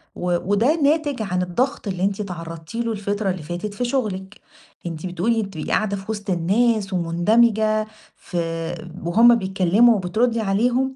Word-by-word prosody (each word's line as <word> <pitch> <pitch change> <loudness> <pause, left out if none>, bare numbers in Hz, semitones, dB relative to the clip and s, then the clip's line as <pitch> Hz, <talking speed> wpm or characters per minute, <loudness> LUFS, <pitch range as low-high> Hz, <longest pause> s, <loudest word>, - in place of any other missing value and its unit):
و 175 -1 0
وده 235 +10 +3
ناتج 290 -4 +1
عن 180 -3 -1
الضغط 215 +7 -1
اللي 185 -1 -2
أنتِ 200 0 0
اتعرضتِ 165 -1 -7
له 230 0 -1
الفترة 205 -1 -2
اللي 180 -4 -3
فاتت 175 +6 -5
في 245 +4 -2
شغلِك، 210 -6 -3 0.4
أنتِ 165 0 -5
بتقولي 215 +6 0
بتبقي 190 -6 -6
قاعدة 200 -2 0
في 195 +3 -6
وسط 205 -1 -6
الناس 195 +3 +1
ومندمجة 215 +5 +2 0.3
في 165 -2 -4 0.3
وهُم 230 +8 +6
بيتكلموا 195 +3 +3
وبتردي 220 +5 0
عليهم 245 +6 +1
200 Hz, 150 wpm, -22 LUFS, 180-230 Hz, 0.4 s, وهُم